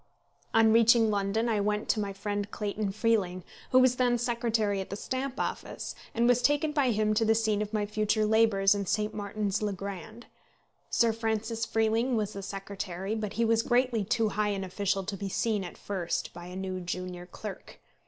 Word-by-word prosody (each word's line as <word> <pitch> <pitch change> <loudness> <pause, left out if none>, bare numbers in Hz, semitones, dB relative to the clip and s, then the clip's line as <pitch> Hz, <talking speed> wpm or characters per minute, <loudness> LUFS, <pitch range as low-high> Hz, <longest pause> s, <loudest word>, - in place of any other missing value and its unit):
On 225 -1 +5
reaching 230 -1 +5
London 205 +3 0
I 220 -3 +1
went 210 +1 -1
to 220 - +2
my 200 -1 -2
friend 205 +1 -3
Clayton 205 -1 -2
Freeling, 200 -4 0 0.3
who 255 - +4
was 255 -1 +5
then 245 -1 +3
secretary 230 -4 0
at 190 - -7
the 200 - -4
Stamp 260 +4 -3
Office, - - -4 0.2
and 235 +1 +3
was 245 0 +4
taken 290 +3 +2
by 285 -4 +2
him 215 -1 +2
to 220 +2 +2
the 225 0 +3
scene 215 -2 +1
of 210 0 -3
my 210 -2 0
future 215 +1 +1
labours 210 -3 +4
in 200 -2 -3
St. 210 +3 0
Martin's 205 -1 -2
le 210 -1 -1
Grand. 200 +4 -7 0.6
Sir 230 -2 +3
Francis 225 0 -2
Freeling 225 +3 +1
was 215 -1 -1
the 200 - -6
secretary, 195 0 -5
but 215 -2 -3
he 230 +1 +1
was 225 0 +3
greatly 245 -2 +2
too 220 +3 +1
high 210 +1 0
an 195 -1 -2
official 195 +1 -1
to 195 +2 -4
be 195 0 -4
seen 210 0 0
at 175 - -8
first 180 -4 -3
by 175 0 -9
a 180 - -8
new 190 -1 -3
junior 180 0 -5
clerk. 195 +1 -8
215 Hz, 195 wpm, -29 LUFS, 195-225 Hz, 0.6 s, On